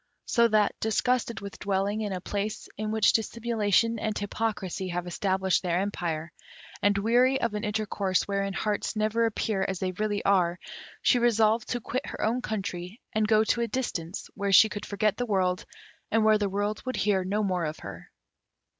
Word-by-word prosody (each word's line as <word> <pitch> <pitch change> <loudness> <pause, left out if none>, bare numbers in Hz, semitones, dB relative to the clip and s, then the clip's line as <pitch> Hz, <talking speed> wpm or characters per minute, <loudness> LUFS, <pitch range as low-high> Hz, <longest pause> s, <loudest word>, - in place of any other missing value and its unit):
So 235 -1 +4
that, 215 -2 +3
disgusted 235 0 0
with 200 -1 -8
dwelling 200 +2 0
in 210 -2 -2
a 185 - -2
place 205 +3 -4
in 215 0 -3
which 220 -1 +3
dissimulation 230 0 +1
and 215 -1 -2
hypocrisy 205 -2 -3
have 175 0 -3
established 190 +1 0
their 175 -2 0
empire, 170 -5 -3 0.5
and 205 0 +3
weary 245 +6 +3
of 230 -2 -1
an 210 +1 -3
intercourse 210 -3 0
wherein 200 -1 -1
hearts 210 +3 -1
never 215 +2 +2
appear 215 -2 -1
as 190 - -2
they 185 +1 -2
really 205 +2 -2
are, 180 -3 +3 0.5
she 245 - +4
resolved 225 -1 +3
to 245 - -2
quit 250 +4 -3
her - - -6
own 235 +4 +1
country 195 -2 -4
and 215 0 +2
go 215 0 +4
to 235 +2 +1
a 235 - +1
distance, 195 -8 -3
where 200 0 -2
she 215 +3 +8
could 205 - -6
forget 210 0 0
the 245 - -2
world, 185 -3 0 0.4
and 220 0 +2
where 215 -1 +5
the 205 -1 0
world 205 +2 -2
would 255 0 -3
hear 195 -2 +1
no 205 +3 0
more 180 -4 0
of 155 0 -4
her. - - -9
210 Hz, 185 wpm, -27 LUFS, 190-220 Hz, 0.5 s, she